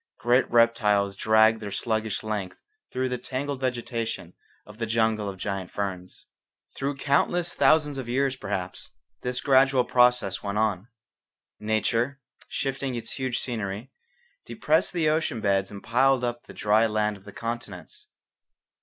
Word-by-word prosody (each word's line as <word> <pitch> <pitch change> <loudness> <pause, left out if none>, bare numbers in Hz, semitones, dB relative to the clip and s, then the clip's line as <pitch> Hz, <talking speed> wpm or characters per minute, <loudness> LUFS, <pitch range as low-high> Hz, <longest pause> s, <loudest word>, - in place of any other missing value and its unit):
Great 120 +2 +2
reptiles 105 -4 +3
dragged 110 +2 +4
their 105 - -5
sluggish 110 0 -2
length 105 -4 -3 0.3
through 130 0 -1
the 125 -1 -3
tangled 135 +2 -4
vegetation 115 -7 -3 0.3
of 105 +1 -14
the 115 - -2
jungle 110 -2 +1
of 95 - -7
giant 95 -1 -4
ferns. 95 -3 -5 0.5
Through 140 +1 -3
countless 170 +5 +1
thousands 150 -3 +3
of 120 -3 -6
years, 135 +2 +1
perhaps, 100 -6 -5 0.3
this 125 0 -2
gradual 135 -1 +4
process 125 -6 +3
went 100 0 -3
on. 105 -2 0 0.7
Nature, 115 +5 0 0.3
shifting 135 -1 -3
its 120 - -5
huge 130 -3 -2
scenery, 110 0 -4 0.5
depressed 150 +8 +1
the 170 -3 0
ocean 155 -5 +1
beds 95 -2 +1
and 100 -1 -9
piled 130 +2 +3
up 120 0 -3
the - - -10
dry 105 +2 +3
land 105 -1 0
of 95 - -16
the 100 - -11
continents. 120 - -6
115 Hz, 145 wpm, -26 LUFS, 105-130 Hz, 0.7 s, dragged